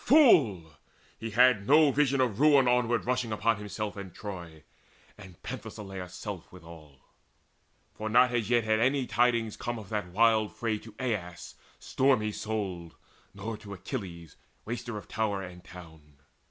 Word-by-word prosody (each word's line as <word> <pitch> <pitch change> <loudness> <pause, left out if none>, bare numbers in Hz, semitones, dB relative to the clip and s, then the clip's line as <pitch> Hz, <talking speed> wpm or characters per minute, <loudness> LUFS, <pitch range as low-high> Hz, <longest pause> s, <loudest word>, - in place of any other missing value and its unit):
Fool! 115 - +4 0.4
he 115 - -5
had 115 -2 +4
no 150 0 +6
vision 140 -1 +2
Of 115 -5 0
ruin 145 -3 +5
onward 120 -1 +2
rushing 125 -2 -1
upon 110 +1 +1
himself 105 0 -5
And 100 -2 -8
Troy, 85 -7 -8 0.5
and 95 -4 -14
Penthesileia's 95 -3 -7
self 100 -4 -7
withal. 80 -6 -14 0.9
For 110 0 -5
not 125 +3 +5
as 115 -3 -1
yet 120 -1 +3
had 110 0 +1
any 130 +3 +2
tidings 120 -3 +1
come 120 0 -4
Of 105 -4 -10
that 105 -3 -2
wild 110 +3 +2
fray 110 -2 -2
to 110 -1 -14
Aias 105 -9 -4 0.2
stormy 130 -5 +1
souled, 95 -7 -4 0.4
Nor 105 +2 -5
to 100 -2 -9
Achilles, 90 - -7 0.3
waster 120 0 -5
of 105 - -9
tower 105 -3 -2
and 90 -1 -10
town. 80 -5 -14
110 Hz, 150 wpm, -29 LUFS, 95-120 Hz, 0.9 s, no